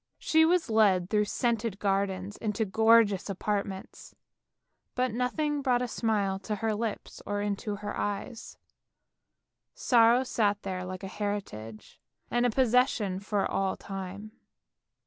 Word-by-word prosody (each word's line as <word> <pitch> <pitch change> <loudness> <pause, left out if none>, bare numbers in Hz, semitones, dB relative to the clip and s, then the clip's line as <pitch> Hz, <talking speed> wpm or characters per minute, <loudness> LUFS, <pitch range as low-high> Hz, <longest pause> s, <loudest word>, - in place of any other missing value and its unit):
She 320 0 +3
was 345 -1 +2
led 195 -5 +3
through 210 -1 +3
scented 230 -2 -1
gardens 195 0 -1
into 220 0 -1
gorgeous 220 -1 +4
apartments, 200 0 -4 0.8
but 255 -1 +1
nothing 290 +5 -1
brought 250 -2 +2
a - - -2
smile 205 -5 0
to 210 +2 -3
her 220 +2 -1
lips, 215 0 -4
or 205 0 -3
into 205 0 -2
her 205 0 -6
eyes, 205 +3 -4 1.2
sorrow 235 +1 +4
sat 205 -5 0
there 185 -1 -4
like 185 +1 -7
a - - -4
heritage 190 - -6 0.3
and 240 +1 +2
a - - +1
posses 250 +2 +3
sion 195 -7 -3
for 200 0 -1
all 195 -1 -1
time. 195 +2 -7
210 Hz, 135 wpm, -29 LUFS, 195-235 Hz, 1.2 s, gorgeous